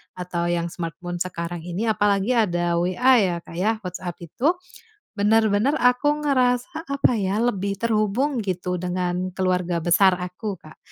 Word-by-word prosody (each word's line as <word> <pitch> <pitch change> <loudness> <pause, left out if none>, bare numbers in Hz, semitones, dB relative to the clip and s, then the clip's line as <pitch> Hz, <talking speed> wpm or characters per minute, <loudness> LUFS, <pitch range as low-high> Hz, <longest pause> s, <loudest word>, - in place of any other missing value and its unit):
atau 175 -1 -3
yang 170 -1 -1
smartphone 175 0 -5
sekarang 170 -1 -4
ini, 180 +7 -2
apalagi 205 +1 +1
ada 175 -7 +1
WA 240 +9 +4
ya, 185 -4 +1
Kak, - - -12
ya, 215 +4 +2
WhatsApp 180 -1 -5
itu 265 - 0 0.6
benar-benar 215 +4 +3
aku 250 +3 +3 0.2
ngerasa 260 +4 +1
apa 275 -2 +2
ya, 195 0 0
lebih 200 -4 0
terhubung 230 +5 0
gitu 180 -2 -2
dengan 180 0 -2
keluarga 180 -2 0
besar 185 +3 +4
aku, 180 +3 -5
Kak. 155 - -15
190 Hz, 145 wpm, -23 LUFS, 175-225 Hz, 0.6 s, WA